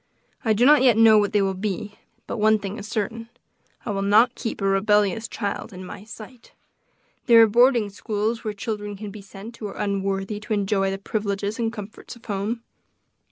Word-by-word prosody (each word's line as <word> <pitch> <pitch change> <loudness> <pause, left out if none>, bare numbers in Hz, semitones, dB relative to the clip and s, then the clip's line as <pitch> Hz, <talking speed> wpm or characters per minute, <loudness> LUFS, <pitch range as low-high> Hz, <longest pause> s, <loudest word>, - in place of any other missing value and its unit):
I 220 -3 +3
do 230 +4 +3
not 295 0 +7
yet 250 -4 +5
know 225 -1 +7
what 205 -1 0
they 205 -2 +2
will 195 0 0
be, 205 +2 -4 0.3
but 235 - -5
one 215 +1 +4
thing 205 +1 -6
is 205 - -8
certain 225 +1 -4 0.6
I 215 - -2
will 195 -1 -2
not 215 +5 +4
keep 230 - -5
a 195 - -2
rebellious 205 +2 +2
child 205 0 -4
in 185 -1 -9
my 190 - -10
sight; 225 +2 -12 0.7
there 235 -2 +8
are - - +5
boarding 240 0 +4
schools 215 +2 -3
where 215 - -2
children 205 -1 -5
can 210 0 -7
be 210 0 -10
sent 200 +4 -11
who 215 - -5
are 195 - -9
unworthy 195 0 -2
to 215 +1 -4
enjoy 195 -1 +1
the 195 - -3
privileges 200 +1 -3
and 225 -1 0
comforts 215 +2 -9
of 235 - -19
home." 215 +3 -3
210 Hz, 200 wpm, -23 LUFS, 200-225 Hz, 0.7 s, there